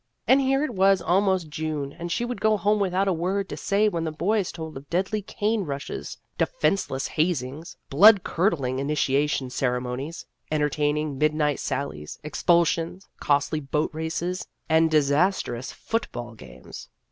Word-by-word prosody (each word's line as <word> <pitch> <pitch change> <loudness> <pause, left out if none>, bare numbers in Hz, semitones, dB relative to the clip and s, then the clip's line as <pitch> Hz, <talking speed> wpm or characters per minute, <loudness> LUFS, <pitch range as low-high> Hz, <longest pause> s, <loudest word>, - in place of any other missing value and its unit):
And 270 +1 +6
here 270 +1 +2
it 305 - -2
was 195 0 +4
almost 185 -1 +1
June, 150 -2 -3
and 170 +1 -6
she 240 - 0
would 245 0 -5
go 215 0 +3
home 210 +1 +2
without 195 0 +1
a 190 - +3
word 190 +4 -1
to - - -4
say 205 +2 +1
when 170 -5 -1
the 160 - -2
boys 190 +5 0
told 160 -2 -7
of 135 +1 -10
deadly 190 +4 0
cane 210 +2 -1
rushes, 140 -4 -5 0.2
defenceless 195 - 0
hazings, 155 -1 -2
blood 200 +6 +7
curdling 145 -8 0
initiation 140 -1 0
ceremonies, 125 +4 -2 0.2
entertaining 150 -1 0
mid 155 0 +2
night 150 -2 +1
sallies, 130 - -4
expulsions, 170 +3 +1
costly 145 +2 +1
boat 150 +2 -1
races, 165 +3 -3 0.2
and 160 0 +4
disastrous 145 -3 +1
football 120 - -4
games. 65 - -12
160 Hz, 145 wpm, -25 LUFS, 140-195 Hz, 0.2 s, blood